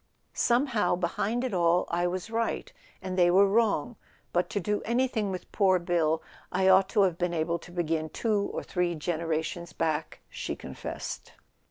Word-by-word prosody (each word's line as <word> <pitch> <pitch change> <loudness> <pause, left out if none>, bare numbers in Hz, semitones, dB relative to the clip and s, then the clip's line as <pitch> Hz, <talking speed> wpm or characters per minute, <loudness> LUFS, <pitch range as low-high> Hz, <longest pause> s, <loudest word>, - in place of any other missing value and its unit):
"Somehow, 235 -7 +2
behind 200 +7 -1
it 255 -5 -2
all, 175 0 +3
I 175 +1 +1
was 185 +5 -4
right, 230 - -2 0.3
and 185 -1 -3
they 175 -1 +6
were 195 +3 +6
wrong; 225 +2 +1 0.4
but 175 +1 +1
to 205 - -1
do 210 +2 -1
anything 235 -3 0
with 185 -2 -6
poor 190 -3 +4
Bill 170 -2 +1 0.3
I 190 +1 +2
ought 190 0 +6
to 210 -3 +3
have 180 -3 +1
been 175 -1 0
able 170 +1 0
to 175 - -13
begin 165 -2 -1
two 205 +3 0
or - - -4
three 180 -2 -1
generations 165 +1 -2
back," 155 -1 -2
she - - -5
confessed. 65 - -7
180 Hz, 170 wpm, -28 LUFS, 170-210 Hz, 0.4 s, they